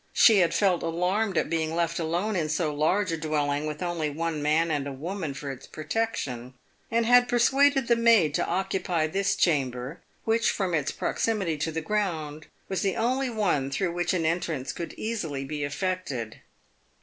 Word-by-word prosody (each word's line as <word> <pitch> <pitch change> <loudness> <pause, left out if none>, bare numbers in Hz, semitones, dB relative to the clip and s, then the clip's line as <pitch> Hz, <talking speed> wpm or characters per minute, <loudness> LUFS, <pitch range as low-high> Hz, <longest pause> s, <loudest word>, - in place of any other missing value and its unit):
She 220 -4 +6
had 170 -3 +3
felt 190 -4 +2
alarmed 180 +4 0
at - - +2
being 160 0 -1
left 170 0 0
alone 175 +6 -1
in 160 -4 0
so 155 0 0
large 180 +6 +1
a 165 - -1
dwelling 150 -1 -1
with 150 +2 -4
only 170 -3 -1
one 160 +1 -3
man 160 +3 +2
and 145 -2 -1
a - - -4
woman 160 +2 -4
for 140 0 -5
its 130 - -10
protection, 150 - -3 0.3
and 230 0 +1
had 245 +1 +5
persuaded 270 +2 +3
the 235 - +4
maid 230 -10 +4
to - - 0
occupy 180 -2 0
this 195 +5 0
chamber, 135 -2 0 0.2
which 225 +1 +2
from 190 -4 -1
its 150 -3 +1
proximity 200 -8 -1
to 150 +3 -2
the 160 +1 -3
ground 160 -6 -2 0.2
was 190 - -2
the 195 -2 0
only 255 +3 0
one 195 - 0
through 175 +6 -1
which 175 +1 0
an 165 -3 0
entrance 160 -5 -1
could 170 - -6
easily 165 -12 -3
be 150 +1 -4
effected. 145 - -3
165 Hz, 180 wpm, -27 LUFS, 150-200 Hz, 0.3 s, She